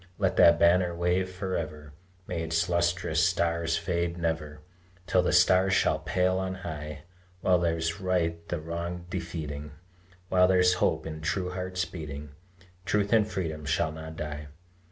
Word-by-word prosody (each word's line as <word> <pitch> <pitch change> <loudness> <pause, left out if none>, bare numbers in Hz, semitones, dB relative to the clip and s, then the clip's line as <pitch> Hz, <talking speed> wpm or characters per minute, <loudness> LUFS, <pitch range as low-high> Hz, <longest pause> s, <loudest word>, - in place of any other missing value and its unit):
Let - - +1
that 85 0 +7
banner 85 +1 +4
wave 90 +2 +1
forever, 80 -6 -5 0.3
May 85 -2 -3
its 80 +1 0
lustrous 85 0 +1
stars 85 -1 +1
fade 85 0 -1
never, 80 -3 -3 0.4
Till - - +3
the - - 0
stars 95 +1 +5
shall 75 -4 +2
pale 90 +4 +1
on 95 0 -2
high; 75 -4 -7 0.4
While 90 -1 +3
there's 85 +1 -1
right 85 -3 -1
the 85 - -2
wrong 85 +2 -5
defeating, 75 -5 -5 0.5
While 90 0 +4
there's 90 -1 +4
hope - - +1
in 80 -1 -6
true 90 +3 -1
hearts 90 0 -2
beating, 75 -5 -7 0.5
Truth 105 +3 +1
and 110 -2 +4
freedom 80 -6 -3
shall 75 +1 0
not 80 +1 -8
die. 75 -1 -5
85 Hz, 150 wpm, -28 LUFS, 80-90 Hz, 0.5 s, that